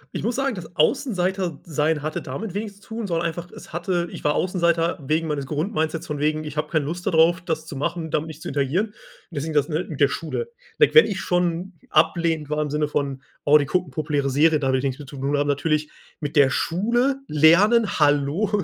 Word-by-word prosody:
Ich - - -3
muss 235 +3 0
sagen, 270 -3 0
das 175 -2 -9
Außenseiter-sein 170 - 0
hatte 155 +1 -3
damit 180 +10 -6
wenig 205 0 -4
zu - - -20
tun, 225 0 -4
sondern 170 -3 0
einfach 170 +1 -6
es - - -13
hatte 175 0 -1
ich - - -9
war 150 - +2
Außenseiter 170 -2 +1
wegen 160 +3 0
meines 145 -3 -2
Grundmindsets 160 +2 -2
von 150 -2 -4
wegen, 155 +1 0
ich 150 -1 -7
habe 150 0 -2
keine 155 -3 0
Lust 175 +4 -5
da 195 - +1
drauf, 170 +2 +4
das 160 -3 -3
zu 155 - -8
machen, 160 +3 -3
damit 155 +2 0
nicht 155 0 -10
zu - - -6
interagieren. 145 +9 0
Und - - -31 0.4
deswegen 155 0 -4
das, 145 -1 +2
ne, 160 +2 -1
mit 150 - -6
der 140 - +6
Schule. 165 - -4 0.3
Wenn 450 - +4
wenn 465 - +9
ich 195 -3 -3
schon 180 +1 -1 0.2
ablehnend 160 -1 +2
war 150 0 0
im 150 - -2
Sinne 150 +1 0
von: 140 -2 -2 0.2
„Oh, 150 +1 +6
die 145 - 0
gucken 175 +1 -1
populäre 145 0 -1
Serien, 155 +3 +3
da 135 - 0
habe 130 0 +2
ich 135 - -2
nix 130 -1 -1
mit 145 -3 -10
zu 140 - -9
tun.“ 140 +2 -1
Aber 145 - +2
natürlich 150 +1 0 0.3
mit 150 +1 -3
der 140 -2 +6
Schule 235 - +1
lernen, 185 +9 +4
hallo? 150 +8 +2
160 Hz, 225 wpm, -23 LUFS, 145-180 Hz, 0.4 s, wenn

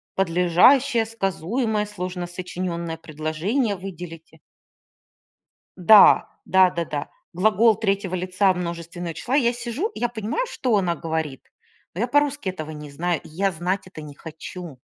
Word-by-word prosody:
подлежащее, 195 +8 +4
сказуемое, 215 +1 -1
сложносочинённое 180 -3 -5
предложение 165 - -2
выделите. 170 -4 -9 1.4
Да 200 +4 +7 0.2
да 190 -1 +5
да 170 -1 -2
да 145 -2 -4 0.3
глагол 215 +3 +4
3 195 -3 -1
лица 185 +2 +2
множественного 170 -1 -5
числа. 240 - -3
Я 240 -5 +3
сижу, 245 - -3
я 240 - -1
понимаю, 230 - -2
что 250 - 0
она 180 -3 +1
говорит, 160 -4 -4 0.4
но 180 - -5
я 235 - +2
по-русски 290 -4 +1
этого 155 -4 -7
не 150 -1 -9
знаю, 170 +2 -1
и - - -13
я 195 +5 0
знать 180 +4 -2
это 170 -4 -10
не 150 -1 -10
хочу. 160 0 -9
185 Hz, 135 wpm, -23 LUFS, 165-220 Hz, 1.4 s, Да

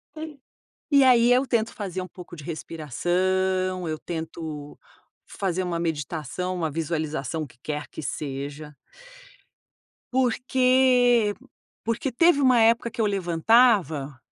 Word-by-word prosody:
Sim. 315 0 -6 0.6
E 280 -2 +6
aí 245 -1 +5
eu 255 +2 +3
tento 230 -3 0
fazer 190 -3 -4
um 185 - -8
pouco 175 0 -11
de 150 - -10
respiração, 185 +4 -1
eu 155 -1 -3
tento 160 -3 -6 0.5
fazer 185 -2 -2
uma 175 -2 -2
meditação, 160 +2 -3
uma 165 -3 -2
visualização 155 -1 -3
que 120 - -21
quer 150 -1 -4
que - - -8
seja. 145 +1 -5 1.4
Porque 250 -2 +3 0.5
porque 230 +4 -2
teve 285 +3 +4
uma 255 -3 +5
época 230 +1 +3
que - - -12
eu 220 - +3
levantava 180 - +2
185 Hz, 120 wpm, -25 LUFS, 155-235 Hz, 1.4 s, E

